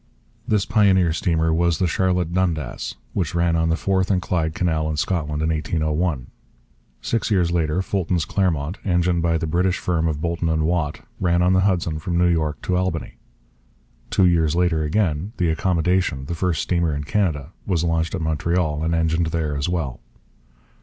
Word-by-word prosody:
This 105 -2 +2
pioneer 95 -7 +3
steamer 80 -1 +1
was 85 0 +2
the 95 - +1
Charlotte 90 -1 0
Dundas, 85 -7 -1 0.2
which 85 -3 -2
ran 85 -1 +2
on 80 0 +1
the 80 - +2
Forth 95 +1 0
and 95 -2 +2
Clyde 80 -3 -1
Canal 80 -3 0
in 75 - -2
Scotland 75 -3 -1
in 80 - +1
1801. 80 -2 -1 0.8
Six 115 0 -1
years 90 -5 +2
later 85 +1 0
Fulton's 90 -4 -1
Clermont, 90 -2 -1
engined 90 -2 +1
by 85 -1 +2
the 80 - -2
British 90 +4 +1
firm 85 -2 0
of 75 -2 -2
Boulton 85 +1 -1
and 80 -1 +1
Watt, 80 -2 -1 0.2
ran 85 -1 +2
on 90 +1 +3
the 95 - +4
Hudson 85 -5 0
from 85 +2 -2
New 90 - +4
York 80 -3 0
to 90 - 0
Albany. 90 -3 -2 0.9
Two 95 - +3
years 85 -3 +3
later 85 -2 +2
again 80 +3 0
the 85 -2 +1
Accommodation, 90 -4 0
the 85 - -4
first 85 -1 -1
steamer 85 -4 0
in 75 - -3
Canada, 80 -4 -1 0.2
was 85 -4 +1
launched 85 +1 0
at 90 - -4
Montreal, 80 0 0
and 85 +1 +1
engined 80 0 +1
there 80 -2 -1
as 70 +4 -1
well. 80 -8 -2
85 Hz, 180 wpm, -22 LUFS, 80-90 Hz, 0.9 s, the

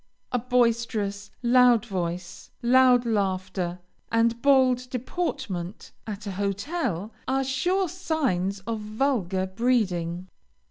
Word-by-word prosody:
A 250 - +1
boisterous, 230 -4 0
loud 245 -2 +5
voice, 175 -4 -4
loud 250 0 +5
laughter, 185 -4 -1 0.3
and 230 +1 +2
bold 255 -2 +4
deportment, 250 - -4 0.2
at 210 -1 -6
a 200 - -3
hotel, 200 - -2
are 270 +1 +1
sure 350 +9 +1
signs 270 - -1
of 225 +3 -3
vulgar 210 -4 0
breeding. 185 -5 0
230 Hz, 100 wpm, -26 LUFS, 190-255 Hz, 0.3 s, loud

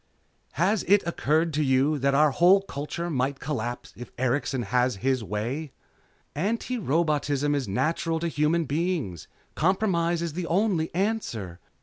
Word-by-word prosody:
"Has 185 +6 +2
it 200 0 +4
occurred 160 -1 +1
to 150 +1 +1
you 140 +2 +2
that 135 +1 +2
our 150 +1 +5
whole 185 +7 +5
culture 170 0 -5
might 135 -3 -1
collapse 120 -5 -4
if 120 - -9
Erikson 130 0 0
has 125 +2 +1
his 130 -3 +1
way?" 120 - -4 0.6
"Antirobotism 155 - 0
is 140 -3 -1
natural 160 - 0
to 170 - 0
human 160 +1 +1
beings. 150 - -2 0.3
Compromise 170 -2 +1
is 165 -3 -3
the 175 +1 -4
only 180 -3 +1
answer. 145 - -2
150 Hz, 135 wpm, -26 LUFS, 130-170 Hz, 0.6 s, our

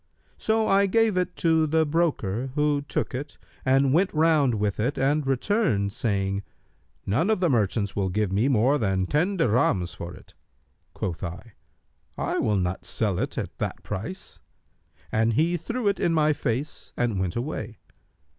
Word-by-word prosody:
So 220 0 +1
I 195 +1 +4
gave 225 +1 +3
it 180 0 -1
to 160 -2 +2
the 160 +1 +2
broker 140 - 0
who 150 -1 +2
took 140 - -3
it 145 +4 -5 0.3
and 135 0 +3
went 185 +4 +3
round 155 -6 +3
with 105 -1 -1
it 125 +7 0
and 140 +1 +1
returned, 135 - +1
saying, 100 -5 -1 0.6
'None 145 - +1
of 220 - +2
the 175 -4 +2
merchants 105 -3 0
will 95 -2 0
give 105 +1 0
me 105 +7 +2
more 135 +3 +3
than 95 -4 +1
ten 175 - 0
dirhams 105 - +1
for 85 0 -7
it.' - - -17 0.6
Quoth 90 -2 -4
I, 95 +6 -7 0.6
'I - - -1
will 105 -2 +1
not 90 0 -2
sell 100 -5 -1
it - - -3
at - - -4
that - - -3
price;' 115 - -6 0.7
and 115 +1 +2
he 165 +8 +2
threw 230 +7 -3
it 200 - +1
in 165 - +1
my 155 -1 +3
face 135 +2 -4
and 115 -5 0
went 90 -2 -1
away. 120 -3 -4
135 Hz, 165 wpm, -25 LUFS, 105-165 Hz, 0.7 s, I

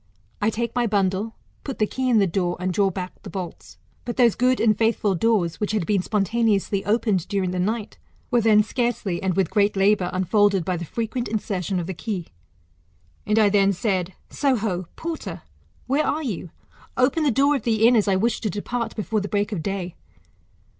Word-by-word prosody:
I 210 - +3
take 230 +1 -3
my 245 -1 +1
bundle, 200 +1 0 0.3
put 270 - -5
the 215 - +2
key 260 +4 -2
in 235 - +4
the 200 - +5
door, 175 0 -1
and 185 0 -1
draw 195 +1 +3
bnck 185 0 -5
the - - -9
bolts. 180 -4 -7 0.3
But 240 - -5
those 240 -4 +5
good 255 +1 +2
and 215 -2 +4
faithful 220 -2 +1
doors, 185 -4 +1
which 210 0 -1
had 210 -6 0
been 200 -1 +1
spontaneously 205 0 0
opened 210 -4 +1
during 195 -3 -1
the 180 - -2
night, 215 +3 -2 0.3
were 240 -1 +3
then 215 -1 +5
scarcely, 215 -6 -2
and 190 -2 0
with 190 -3 +1
great 205 -1 +2
labour, 195 -2 +3
unfolded 195 0 +2
by 185 - 0
the 170 - -5
frequent 230 - -3
insertion 195 -4 -2
of 170 - -3
the 190 - -4
key. 185 -2 -5 1.0
And 215 - +2
I 215 -2 +5
then 200 -1 +3
said, 190 -3 -1 0.2
Soho, 215 - 0
porter! 330 -1 -5 0.4
where 280 +4 +1
are 310 +2 -1
you? 200 - -4 0.5
Open 260 +5 +2
the 300 - +3
door 280 +4 +3
of 275 - -2
the 225 -2 +3
inn, 245 - +5
as 215 -2 +3
I 195 - +3
wish 225 +5 0
to 215 - -1
depart 230 +5 -3
before 215 0 -1
the 200 - -5
break 205 +1 0
of 195 -6 -2
day. 185 0 -3
210 Hz, 200 wpm, -23 LUFS, 190-230 Hz, 1.0 s, the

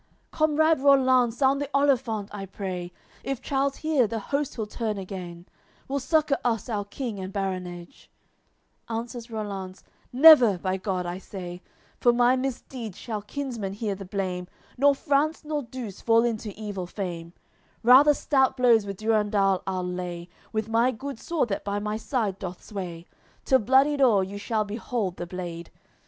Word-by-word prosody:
AOI. - - -40
LXXXIV - - -38
"Comrade 315 0 +3
Rollanz, 260 -4 +4
sound 275 +1 +3
the 285 - -2
olifant, 255 -7 +1
I 195 -1 -6
pray; 180 -2 -5 0.3
If 270 -3 -3
Charles 275 0 -1
hear, 305 -7 +1
the 225 - -3
host 280 +6 -2
he'll 220 - -3
turn 215 0 -3
again; 180 -3 -7 0.4
Will 280 +1 -1
succour 300 +1 +1
us 230 -1 -1
our 205 -3 -2
King 220 0 -5
and 190 0 -5
baronage." 185 -3 -5 0.8
Answers 230 +1 -5
Rollanz: 200 -4 -6 0.3
"Never, 255 - +8
by 185 +1 -2
God, 185 -2 -2
I 175 +1 -4
say, 180 -2 -8 0.4
For 240 - +5
my 245 +1 +4
misdeed 255 -4 -4
shall 215 -3 -5
kinsmen 230 -4 -4
hear 205 0 -2
the 195 0 -7
blame, 180 -2 -3 0.3
Nor 280 +2 +4
France 290 +3 +1
the 300 -1 -2
Douce 235 -7 -7
fall 230 0 +4
into 225 -3 -2
evil 200 -4 -5
fame! 175 -3 -5 0.5
Rather 270 +5 +7
stout 265 -2 +2
blows 235 -4 +4
with 195 -1 -5
Durendal 210 -3 +2
I'll 185 -1 -1
lay, 180 -1 -5 0.2
With 220 -1 -2
my 230 +2 +3
good 260 +1 -6
sword 320 -6 -1
that 195 - -2
by 200 0 -2
my 210 +1 -2
side 220 -4 -2
doth 180 -1 -7
sway; 175 -5 -6 0.4
Till 260 - +4
bloodied 270 +5 +3
o'er 220 -7 +5
you 200 +2 -6
shall 215 +1 -1
behold 210 -2 -3
the 175 - -5
blade. 175 -2 -6
220 Hz, 165 wpm, -26 LUFS, 190-260 Hz, 0.8 s, Never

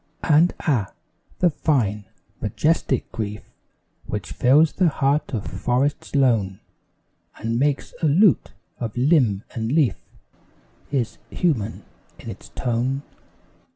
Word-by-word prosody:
And 160 +3 +4
ah! 120 - 0 0.5
the 175 -2 +4
fine, 110 -10 0 0.4
majestic 155 -4 0
grief 105 -1 -4 0.6
Which 95 -7 -4
fills 145 - +4
the 180 -4 +3
heart 140 +1 0
of 110 -7 -3
forests 125 +10 -1
lone, 110 -9 +2 0.8
And 115 +1 -2
makes 140 0 0
a 160 - +3
lute 175 +4 +4 0.3
of 115 -1 -4
limb 125 - +3
and 115 0 -2
leaf 150 -4 +3 0.9
Is 130 -6 -1
human 120 - -1 0.3
in - - -7
its - - -12
tone. 125 +4 -1
130 Hz, 115 wpm, -23 LUFS, 110-150 Hz, 0.9 s, And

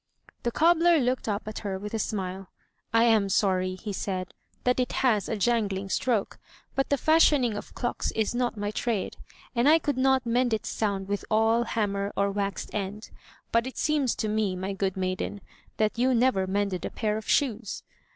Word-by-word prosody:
The 240 - 0
cobbler 335 +3 +4
looked 250 -4 0
up 205 +1 -2
at 215 - -5
her 195 -3 -3
with 210 +3 -7
a 225 - -1
smile. 190 -2 -3 0.4
"I 230 +1 +4
am 220 -4 +4
sorry,'* 185 -1 +1
he 205 +2 -6
said, 185 -1 -3 0.3
"that 250 0 +2
it 250 - 0
has 225 -6 +1
a 225 - 0
jangling 200 -3 0
stroke, 225 +1 0 0.3
but 270 - 0
the 285 - +2
fashioning 290 -6 +4
of - - -8
clocks 240 - -2
is 220 0 0
not 240 -2 -1
my 205 0 -2
trade, 220 -2 -2 0.4
and 240 +4 +4
I 320 - +7
could 290 -5 -2
not 265 -1 +3
mend 240 0 +2
its 215 - -5
sound 200 -3 -1
with 200 0 -2
awl, 225 +2 +3
hammer, 200 -3 -1
or 200 0 +2
waxed 200 -2 -3
end. 205 +1 -4 0.4
But 230 +2 +2
it 260 - -8
seems 290 -5 +1
to 215 - -2
me, 210 -3 0
my 190 +2 -3
good 195 -1 -2
maiden, 185 +2 -2 0.4
that 215 +1 0
you 255 +1 +3
never 230 -6 +2
mended 200 -1 -1
a - - -2
pair 215 -2 -1
of 220 0 -6
shoes." 230 -6 0
215 Hz, 190 wpm, -27 LUFS, 200-245 Hz, 0.4 s, I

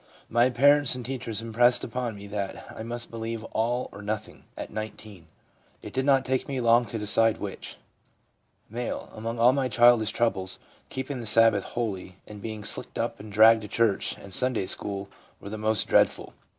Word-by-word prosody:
My 120 +2 +4
parents 145 +2 +4
and 125 -2 -7
teachers 115 -4 -4
impressed 120 +2 +3
upon 120 -1 -3
me 100 0 -10
that 100 -1 -6
I - - -7
must 120 +1 -5
believe 115 -1 -5
all 120 +3 0
or 105 - -10
nothing 105 +1 -5
(at - - -7
19.) 110 -5 -8 0.6
It - - -9
did 130 0 -1
not 135 -2 +3
take 130 0 -1
me 135 -2 -3
long 120 0 +4
to 115 - -5
decide 110 +1 +2
which/ 100 -2 -7 1.0
M. 120 0 -2
' - - -21
Among 115 +2 -5
all 120 +2 +5
my 135 -1 0
childish 120 -1 +5
troubles, 100 -5 -1 0.2
" - - -32
keep 130 +1 -5
ing 135 - -4
the 115 - -6
Sabbath 110 -2 +4
holy," 95 -6 -4
and 105 -1 -11
being 110 -1 -6
slicked - - -3
up - - -2
and 105 0 -10
dragged 110 +2 +6
to 105 - -7
church 110 -1 0
and 100 -1 -12
Sunday 125 -5 +1
school 100 +1 -2 0.3
were 100 - -9
the 110 - -5
most 110 -1 +1
dreadful. - - +2
115 Hz, 190 wpm, -26 LUFS, 105-120 Hz, 1.0 s, dragged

